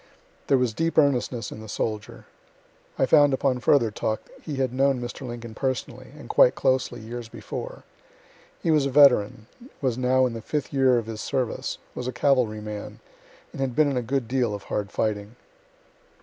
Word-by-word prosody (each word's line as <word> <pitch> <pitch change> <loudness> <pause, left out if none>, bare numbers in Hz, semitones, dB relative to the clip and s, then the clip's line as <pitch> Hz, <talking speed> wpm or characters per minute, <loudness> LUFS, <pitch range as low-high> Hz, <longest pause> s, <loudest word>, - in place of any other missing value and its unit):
There 135 - +4
was 125 -3 0
deep 165 +7 -1
earnestness 125 -6 +2
in - - -8
the 110 - -10
soldier. 105 0 -4 0.7
(I - - +3
found 145 -1 +5
upon 130 -1 0
further 125 -3 +3
talk 110 +1 -2 0.2
he 150 - -5
had 130 -2 -1
known 135 0 +2
Mr. 120 +2 -6
Lincoln 120 -1 -7
personally, 130 0 -3
and 150 - -11
quite 125 - +5
closely, 130 -2 0
years 115 +1 -7
before.) - - -7 0.8
He 165 - +2
was 150 -3 +3
a - - -2
veteran; 125 -7 +5 0.3
was 130 -3 -1
now 130 +1 +3
in 125 - -2
the 115 - -6
fifth 150 +4 -3
year 130 -2 +4
of 115 - -2
his 110 -1 -6
service; 125 -4 -2 0.2
was 125 - -5
a - - -1
cavalry 125 -7 +1
man, 105 -1 -7 0.5
and - - -7
had 130 -3 -1
been 150 -2 +3
in - - -2
a 125 - +1
good 125 0 -2
deal 120 -4 0
of 100 - -9
hard 100 -1 -3
fighting. 105 +1 -2
125 Hz, 185 wpm, -25 LUFS, 115-135 Hz, 0.8 s, found